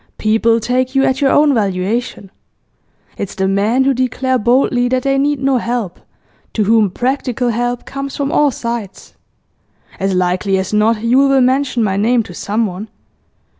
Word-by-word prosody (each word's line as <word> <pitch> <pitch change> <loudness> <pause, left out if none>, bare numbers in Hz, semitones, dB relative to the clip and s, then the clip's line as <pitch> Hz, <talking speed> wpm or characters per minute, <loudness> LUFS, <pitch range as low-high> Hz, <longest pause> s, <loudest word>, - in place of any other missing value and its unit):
People 225 +1 +2
take 255 +3 -1
you 270 - +3
at 260 0 0
your 275 - +3
own 290 0 +4
valuation. 200 0 -2 0.9
It's 200 - -5
the 190 0 0
men 210 +7 +1
who 275 +1 +2
declare 255 +1 -1
boldly 245 +1 +2
that 255 0 -1
they 275 0 +1
need 290 0 0
no 270 -1 +1
help 235 -6 -3 0.5
to 215 - +1
whom 215 0 +3
practical 250 +3 -2
help 245 +1 -2
comes 275 0 -6
from 280 0 -2
all 295 -1 +3
sides. 235 -5 -6 0.9
As 195 0 -1
likely 185 +2 0
as 190 +2 -3
not 215 +1 +2
Yule 260 +4 +3
will 270 -1 +3
mention 255 -1 +1
my 195 -2 0
name 230 +3 +2
to 180 - -11
someone. 210 +1 -3
240 Hz, 165 wpm, -16 LUFS, 210-260 Hz, 0.9 s, own